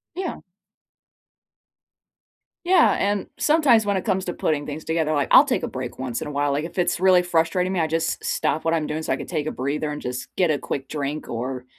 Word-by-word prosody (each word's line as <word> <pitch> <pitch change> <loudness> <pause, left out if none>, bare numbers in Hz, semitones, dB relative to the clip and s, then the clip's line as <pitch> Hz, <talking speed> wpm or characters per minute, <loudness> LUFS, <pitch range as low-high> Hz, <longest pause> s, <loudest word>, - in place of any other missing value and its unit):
Yeah. 370 -1 -4 2.2
Yeah, 355 - +5
and 200 0 0
sometimes 295 -8 +4
when 200 -1 0
it 190 - -2
comes 190 -3 0
to 175 - -2
putting 145 -2 -1
things 150 +1 -6
together, 160 -1 0
like, 145 -3 0
I'll - - +9
take - - -1
a - - -2
break - - -6
once 125 -2 -3
in 150 - -4
a - - -5
while. 145 0 0
Like, 145 +2 -1
if 170 +3 -8
it's 175 -1 +1
really 185 -1 +5
frustrating 180 +1 +1
me, 185 - 0
I 160 - +1
just 165 +1 -1
stop 155 +3 -1
what 165 - +1
I'm 160 -2 0
doing 155 +1 -3
so - - -1
I - - +1
could - - -7
take 150 -1 -2
a - - -1
breather 145 +3 -2
and 150 - -5
just 125 0 -5
get 180 -3 +2
a 145 - -1
quick 135 +1 -5
drink 145 0 -4
or 125 +2 -4
160 Hz, 230 wpm, -23 LUFS, 145-185 Hz, 2.2 s, I'll